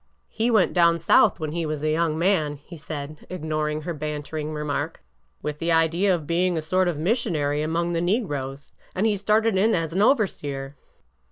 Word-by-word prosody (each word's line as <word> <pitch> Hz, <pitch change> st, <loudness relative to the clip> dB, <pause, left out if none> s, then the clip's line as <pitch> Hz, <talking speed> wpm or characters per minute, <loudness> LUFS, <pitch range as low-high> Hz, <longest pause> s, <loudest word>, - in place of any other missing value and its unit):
He 225 Hz, +2 st, 0 dB
went 215 Hz, -6 st, +3 dB
down 170 Hz, -1 st, +4 dB
South 170 Hz, +1 st, +4 dB
when 155 Hz, -2 st, -3 dB
he 170 Hz, +1 st, -2 dB
was 155 Hz, -2 st, -3 dB
a 155 Hz, -, +1 dB
young 160 Hz, 0 st, +1 dB
man," 165 Hz, -4 st, +1 dB
he 145 Hz, +5 st, -13 dB
said, 150 Hz, -1 st, -7 dB
ignoring 155 Hz, -3 st, -2 dB
her 170 Hz, -, -3 dB
bantering 150 Hz, 0 st, -4 dB
remark, 150 Hz, -2 st, -3 dB, 0.4 s
with 150 Hz, 0 st, -4 dB
the 170 Hz, 0 st, 0 dB
idea 165 Hz, +4 st, +3 dB
of 160 Hz, -4 st, -6 dB
being 175 Hz, +2 st, +1 dB
a -, -, -1 dB
sort 185 Hz, +3 st, +1 dB
of 170 Hz, -4 st, -1 dB
missionary 155 Hz, -, 0 dB
among 170 Hz, +2 st, -1 dB
the 165 Hz, -, 0 dB
negroes, 145 Hz, -, -2 dB, 0.2 s
and 190 Hz, +4 st, +1 dB
he 215 Hz, -2 st, +2 dB
started 210 Hz, +1 st, +2 dB
in 215 Hz, +4 st, +3 dB
as 165 Hz, -2 st, -2 dB
an 190 Hz, -, +1 dB
overseer." 145 Hz, -, 0 dB
165 Hz, 185 wpm, -24 LUFS, 150-185 Hz, 0.4 s, down